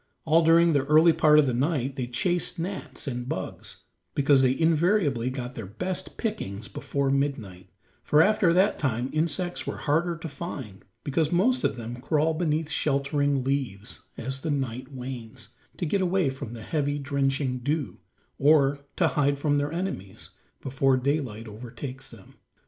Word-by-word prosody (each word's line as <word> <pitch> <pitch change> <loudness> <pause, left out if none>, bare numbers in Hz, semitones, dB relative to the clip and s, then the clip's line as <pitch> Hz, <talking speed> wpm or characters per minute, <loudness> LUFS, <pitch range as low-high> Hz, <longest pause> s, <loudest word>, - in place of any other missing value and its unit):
All 165 +1 +4
during 165 +1 +5
the 140 -2 +2
early 155 +3 +6
part 150 -1 +5
of 150 - +6
the 130 - 0
night 135 0 0
they 125 -3 -3
chased 175 +9 0
gnats 185 +4 -5
and 125 -1 -4
bugs, 95 - -6 0.3
because 140 -1 +4
they 130 0 +2
invariably 160 - +2
got 130 -1 -5
their 115 -6 -7
best 180 - -4
pickings 115 - -4
before 140 -1 -2
midnight, 110 -11 -2 0.3
for 150 - +3
after 205 -3 +3
that 185 +4 +3
time 125 -2 -1
insects 170 +3 -1
were - - -3
harder 165 +3 0
to 165 - -6
find 135 - -7 0.2
because 150 +2 0
most 245 +9 +2
of - - +1
them 120 0 -6
crawl 155 +4 +1
beneath 160 -1 -1
sheltering 140 -2 +1
leaves, 125 -7 -3
as 130 +2 -3
the 160 - -3
night 130 -2 -3
wanes, 125 -4 -7 0.3
to - - -2
get 190 +5 +1
away 180 -5 +2
from 130 -3 -7
the 115 -2 -8
heavy, 145 +2 -1
drenching 135 -2 -1
dew, 145 +3 -2 0.4
or 140 -1 +4 0.2
hide 145 -5 +2
from 145 0 +1
their 145 +1 -1
enemies 165 - -4 0.3
before 135 0 +2
daylight 130 -5 -2
overtakes 125 +5 -7
them. 110 -5 -16
140 Hz, 160 wpm, -26 LUFS, 125-160 Hz, 0.4 s, early